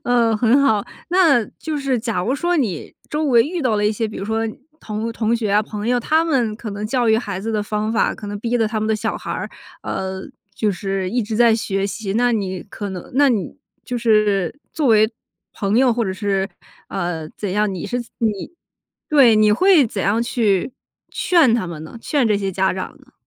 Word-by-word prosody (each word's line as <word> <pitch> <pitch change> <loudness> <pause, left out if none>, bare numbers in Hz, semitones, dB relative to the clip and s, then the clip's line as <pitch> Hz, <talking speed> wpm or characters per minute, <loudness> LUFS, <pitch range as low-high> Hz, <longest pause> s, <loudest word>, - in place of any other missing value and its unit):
呃， 235 -2 +3
很 240 +5 +4
好。 215 -7 +2 0.2
那 330 -10 +4
就 315 -1 -3
是 275 -3 0
假 225 -5 -2
如 255 +7 0
说 345 +5 0
你 210 - -2
周 305 +1 -1
围 240 -5 +5
遇 335 +6 -3
到 245 -6 +1
了 210 - 0
一 - - +3
些， 220 +1 -1
比 215 - -8
如 195 - -4
说 220 +1 -1 0.4
同 220 +2 -4
同 225 0 0
学 225 -3 -1
啊、 210 +1 +4
朋 210 0 -6
友， 245 0 +3
他 315 +6 +2
们 250 -9 +1
可 220 -2 -6
能 205 +1 -4
教 240 0 +1
育 220 - +5
孩 200 -5 -4
子 225 +3 -3
的 210 -1 0
方 210 +1 -2
法， 230 - +1
可 210 - -9
能 205 0 -5
逼 235 +3 -1
得 225 -2 +2
他 215 0 -2
们 215 - -1
的 220 - +2
小 215 - -2
孩 - - -7
儿， - - -3 0.3
呃， 190 0 -4 0.3
就 210 0 +1
是 195 -1 -3
一 240 0 0
直 215 +1 -3
在 235 -1 +5
学 195 -3 -1
习， 200 -1 -4
那 245 +2 +3
你 190 -4 -2
可 205 0 -6
能 180 -2 -8
那 285 +1 +5
你 225 -1 -1 0.3
就 245 -1 -3
是 215 - +2
作 305 -3 0
为 220 0 +5 0.4
朋 200 +1 -1
友 255 -1 +4
或 235 0 0
者 190 - -2
是 195 -1 -1 0.4
呃 175 -4 -3
怎 200 -3 -5
样， 210 0 +1
你 180 - -5
是 245 - -2 0.2
你 215 - -2 0.6
对， 270 -7 +6
你 215 0 +5
会 310 - +5
怎 205 -3 -4
样 220 +4 +2
去 230 -1 0 0.4
劝 320 -10 +3
他 230 -6 0
们 165 -3 -7
呢？ 160 +9 -10
劝 275 0 +1
这 210 - +3
些 195 -1 -2
家 190 +1 +1
长 185 0 -5
呢？ - - -23
220 Hz, 235 characters per minute, -20 LUFS, 200-245 Hz, 0.6 s, 对